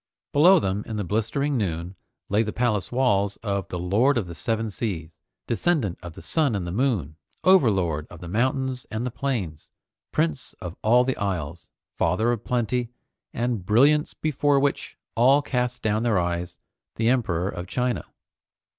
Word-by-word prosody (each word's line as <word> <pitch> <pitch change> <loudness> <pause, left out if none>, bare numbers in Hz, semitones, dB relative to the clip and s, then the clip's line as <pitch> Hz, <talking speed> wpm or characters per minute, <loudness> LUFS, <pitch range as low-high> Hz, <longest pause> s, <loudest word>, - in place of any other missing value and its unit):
Below 175 +7 +7
them 100 -4 -1
in 110 - -4
the 105 - -1
blistering 120 - 0
noon 85 -2 -3 0.3
lay 105 +2 +2
the 110 -1 -1
palace 110 -5 0
walls 100 -6 +2
of 100 -3 -2
the 90 - -5
Lord 105 +10 +2
of 110 - 0
the 85 - -8
Seven 110 +6 -1
Seas, 90 -7 -4 0.3
Descendant 120 - 0
of 85 -2 -8
the - - -12
Sun 150 -8 +1
and 95 -3 -2
the 85 - -4
Moon, 100 - 0 0.3
Overlord 95 - +3
of 85 - -11
the 90 - -8
Mountains 130 +5 -1
and 110 +3 -3
the 125 - -2
Plains, 105 - -3 0.4
Prince 80 -4 -1
of 90 -2 -6
all 120 +3 +5
the 130 0 -1
Isles, 85 -3 -3 0.3
Father 95 +8 +2
of 120 -2 -3
Plenty, 120 0 -1 0.4
and 120 -5 -2
Brilliance 140 +10 +3
Before 145 -2 +1
Which 140 0 -1 0.2
All 135 +5 +4
Cast 125 -2 -2
Down 110 0 +1
Their 115 -4 +2
Eyes, 85 0 -2 0.4
the 115 - 0
Emperor 95 -9 +1
of 90 -2 -5
China. 125 +3 -1
110 Hz, 165 wpm, -25 LUFS, 90-125 Hz, 0.4 s, Below